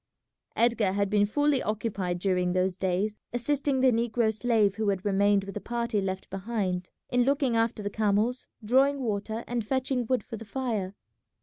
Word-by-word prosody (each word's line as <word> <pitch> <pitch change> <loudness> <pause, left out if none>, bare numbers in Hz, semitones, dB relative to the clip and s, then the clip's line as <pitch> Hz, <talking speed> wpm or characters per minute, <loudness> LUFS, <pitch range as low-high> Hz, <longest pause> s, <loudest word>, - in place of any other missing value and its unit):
Edgar 230 -4 +2
had 200 0 0
been 205 -1 +3
fully 290 +4 +2
occupied 200 -4 -2
during 180 -1 0
those 185 0 +1
days 190 +3 -1
assisting 275 +2 0
the 260 -1 +5
negro 230 -1 +1
slave 220 -3 +2
who 215 0 -1
had 195 -1 -2
remained 200 0 +3
with 195 0 -7
the 210 - -5
party 235 -3 -1
left 190 0 -3
behind 190 -3 -2 0.2
in 245 0 +3
looking 270 -1 +2
after 225 -1 0
the 205 - -2
camels, 215 +4 0 0.2
drawing 270 +4 +3
water, 220 +1 -2
and 240 -1 -2
fetching 260 +1 -1
wood 255 0 +1
for 230 - -7
the 225 - -8
fire. 215 -6 -3
220 Hz, 175 wpm, -28 LUFS, 200-245 Hz, 0.2 s, the